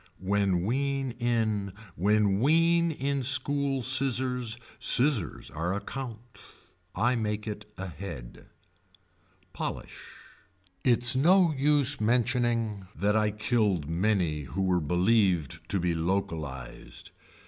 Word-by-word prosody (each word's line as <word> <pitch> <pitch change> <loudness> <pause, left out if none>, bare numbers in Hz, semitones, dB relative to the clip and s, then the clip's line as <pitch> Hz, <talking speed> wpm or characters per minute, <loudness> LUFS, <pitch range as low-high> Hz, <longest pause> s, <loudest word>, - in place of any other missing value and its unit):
When 95 -2 0
wean 135 +2 -1
in. 110 -5 0 0.2
When 100 +1 +2
wean 165 +5 +3
in 140 -2 -2
school 135 0 0
scissors. 125 -2 -1 0.2
Scissors 125 - +1
are 85 +7 -2
a - - -2
count. 120 -4 -8 0.6
I 120 +6 +2
make 105 -2 -2
it 105 -1 -7
ahead. 85 -9 -8 1.1
Polish. - - -5 0.8
Its 120 0 +5
no 170 +4 +4
use 145 -1 +2
mentioning 115 -3 0
that 105 +1 +1
I 105 -1 +2
killed 105 - 0
many 85 -4 0
who 95 +8 -3
were 90 -2 +1
believed 90 - +1
to 100 - 0
be 85 0 0
localized. 80 -7 -4
110 Hz, 105 wpm, -28 LUFS, 95-130 Hz, 1.1 s, Its